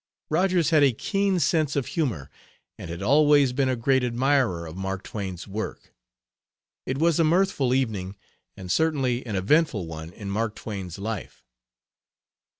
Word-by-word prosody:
Rogers 175 0 +2
had 155 -2 +5
a 140 -3 +5
keen 195 - 0
sense 155 -1 +1
of 140 -3 0
humor 125 - -2 0.4
and - - -9
had 85 +3 -5
always 145 +1 +4
been 135 0 +1
a 130 - +1
great 130 +2 +2
admirer 125 -7 +1
of 80 0 -8
Mark 95 0 -4
Twain's 95 -4 -6
work. 105 +2 -6 0.9
It 130 - -1
was 165 +2 +2
a - - +5
mirthful 160 -5 +2
evening, 110 -8 -1 0.4
and 90 -2 -6
certainly 135 -6 +1
an 105 - -3
eventful 110 - +2
one 80 0 -8
in 100 +2 -7
Mark 110 +1 -1
Twain's 95 -5 -6
life. 105 -1 -6
125 Hz, 150 wpm, -25 LUFS, 95-150 Hz, 0.9 s, had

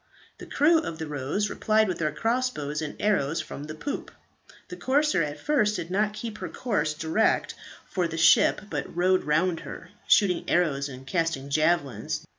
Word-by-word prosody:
The - - -10
crew 320 +3 +4
of 165 - -5
the 160 - -4
"Rose" 150 +8 -2
replied 215 +1 +2
with 185 - -3
their 155 -2 0
crossbows 225 - -1
and 150 -2 -5
arrows 165 -7 +1
from 145 - -6
the 155 0 -7
poop. 285 - -5 0.6
The - - -6
corsair 285 - +2
at 150 -1 -3
first 225 -9 +1
did 170 -2 -5
not 210 +2 +1
keep 215 -1 -6
her - - -5
course 155 -11 -1
direct 160 +8 +1 0.3
for 180 -3 -1
the 165 0 -6
ship, 165 - +5
but - - -5
rowed 185 +1 +2
round 160 +3 +1
her, - - -9 0.2
shooting 190 -5 +3
arrows 150 -5 +1
and 130 0 -10
casting 140 -3 -2
javelins. 145 -7 0
170 Hz, 175 wpm, -26 LUFS, 150-210 Hz, 0.6 s, ship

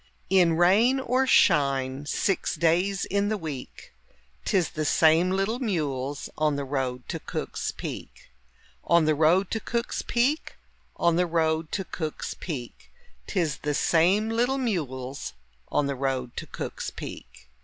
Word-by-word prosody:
In 180 -3 +5
rain 215 +10 +4
or 260 +1 +1
shine, 140 - +3
six 195 +5 0
days 180 +4 +1
in 200 +1 0
the 215 - 0
week, 150 -8 -8 0.5
'Tis 185 -4 +2
the 155 - -3
same 160 +3 +4
little 195 +5 0
mules 145 - -2
on 155 -1 +2
the 140 0 -3
road 130 -2 -3
to - - -3
Cook's - - -4
Peak. - - -8 0.5
On 170 -2 +4
the 155 - +3
road 165 +6 +3
to 225 - 0
Cook's 235 +2 -2
Peak, 260 +6 0 0.4
On 170 -1 +2
the 180 0 +2
road 160 -1 0
to 195 - -1
Cook's 155 -4 -4
Peak, 130 -9 -7 0.4
'Tis 155 -5 0
the 150 -1 -2
same 185 +9 +3
little 245 +4 +1
mules 140 - -3 0.3
on 145 - +1
the 140 - -1
road 130 -2 -2
to - - -5
Cook's - - -5
Peak. - - -10
165 Hz, 145 wpm, -26 LUFS, 140-200 Hz, 0.5 s, In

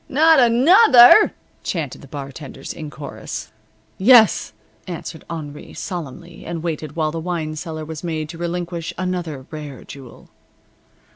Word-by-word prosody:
"Not 315 +2 +5
another!" 255 - +7 0.3
chanted 155 -8 -4
the 140 - -13
bartenders, 140 0 -8
in 155 -2 -8
chorus. 145 -1 -8 0.5
"Yes," 225 +2 +5 0.4
answered 165 -2 -7
Henri, 150 -3 -8
solemnly, 170 0 -7
and 165 -1 -5
waited 155 -3 -4
while 155 -2 0
the 165 - -4
wine 165 -2 -3
cellar 155 -1 -6
was 160 +1 -8
made 160 -3 -3
to 165 - -8
relinquish 175 -1 -4
another 175 -7 -4
rare 150 -4 -8
jewel. 135 -3 -13
165 Hz, 130 wpm, -20 LUFS, 150-180 Hz, 0.5 s, another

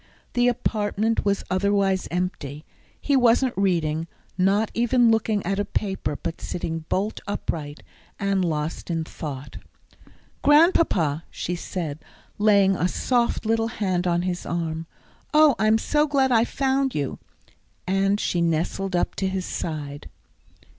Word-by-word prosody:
The 245 0 +3
apartment 220 -2 0
was 200 -1 +1
otherwise 195 0 +1
empty. 165 -5 -3 0.3
He 285 - +1
wasn't 245 0 +4
reading, 165 -4 0 0.3
not 195 +4 +2
even 240 0 +3
looking 220 -3 +1
at 195 +2 -1
a - - +2
paper, 190 -7 -2
but 160 - -5
sitting 165 -2 -4
bolt 205 +3 -1
upright, 150 -7 -4 0.4
and 200 -2 +1
lost 155 0 -3
in 165 -1 -1
thought. 145 -3 -7 0.8
"Grandpapa," 295 - +4
she 180 - -4
said, 170 -4 -4 0.4
laying 200 -2 +4
a 180 - +1
soft 240 +4 0
little 225 +1 +1
hand 185 -5 -1
on 175 0 +1
his 180 -1 -2
arm. 165 -1 -3 0.5
"Oh, 305 -2 +7
I'm 215 0 +4
so 300 +6 +1
glad 270 -3 +2
I 230 -1 +4
found 270 0 0
you." 140 -3 -2 0.7
And 195 +2 +1
she 175 - 0
nestled 170 +3 0
up 175 - 0
to 190 - 0
his 190 -1 -2
side. 145 -3 -5
195 Hz, 135 wpm, -24 LUFS, 165-225 Hz, 0.8 s, Oh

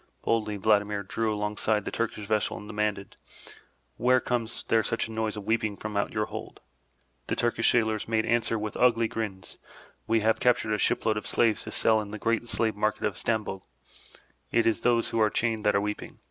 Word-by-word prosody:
Boldly 110 -2 0
Vladimir 105 0 +2
drew 110 +3 -1
alongside 105 0 -1
the - - -3
Turkish 110 -2 -3
vessel 105 0 0
and 105 - -10
demanded, 105 -2 -2 0.8
*'Why 125 +2 +4
comes 120 -2 -2
there 115 - +4
such 115 +2 -1
noise 110 -1 -2
of 105 - -6
weeping 110 -1 0
from 110 -1 -6
out 100 - 0
your 105 -1 0
hold?'* - - -8 0.7
The - - -1
Turkish 120 -1 +2
sailors 110 -2 +1
made 110 -1 +1
answer 115 -1 +1
with 105 -1 -4
ugly 115 -2 +4
grins, 95 -6 -5 0.5
We 115 0 +2
have 110 +1 +2
captured 115 -3 +2
a 105 - 0
ship - - +1
load 110 -1 +2
of 105 - -5
slaves 115 -2 +1
to - - -6
sell 110 -1 +3
in 105 - -7
the 110 - -6
great 115 +2 0
slave 110 -2 +1
market 105 +1 -1
of - - 0
Stamboul. 110 -4 -2 0.9
It 115 - +3
is 115 0 +2
those 115 -1 +2
who 115 - 0
are 110 - +4
chained 110 -1 -1
that 105 - +3
are 100 - +3
weeping. 105 0 -5
110 Hz, 200 wpm, -27 LUFS, 105-115 Hz, 0.9 s, Why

